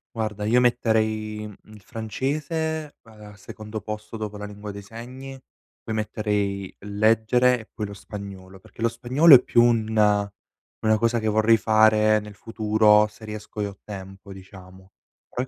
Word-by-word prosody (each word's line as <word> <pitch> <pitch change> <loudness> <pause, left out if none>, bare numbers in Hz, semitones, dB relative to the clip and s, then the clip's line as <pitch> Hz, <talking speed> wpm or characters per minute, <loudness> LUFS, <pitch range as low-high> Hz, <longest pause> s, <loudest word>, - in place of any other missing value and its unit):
Guarda, 105 -2 -3
io 120 +3 +4
metterei 110 -3 0
il 105 0 -12
francese 150 - -3
al 105 -2 -14
secondo 110 +2 -8
posto 105 +1 -7
dopo 105 -1 -5
la 105 - -6
lingua 105 0 -9
dei 100 0 -8
segni, 125 +5 -9 0.5
poi 110 - -5
metterei 105 -2 -2
leggere 110 +5 +2
e - - -14
poi 105 -2 -4
lo 100 - -9
spagnolo. 95 -2 -10
Perché 115 - -10
lo 115 - +3
spagnolo 130 +7 +4
è 125 - +10
più 120 0 +4
una 110 -3 +2 0.5
una 110 0 +3
cosa 115 +1 +1
che 110 - -3
vorrei 110 +1 +4
fare 110 0 +4
nel 105 -1 -11
futuro 105 -1 +3
se 110 +1 -14
riesco 105 0 -7
e 100 - -1
ho 100 -1 -10
tempo, 95 -1 -10
diciamo, 95 0 -14 0.4
però 125 +1 -4
110 Hz, 155 wpm, -24 LUFS, 105-115 Hz, 0.5 s, è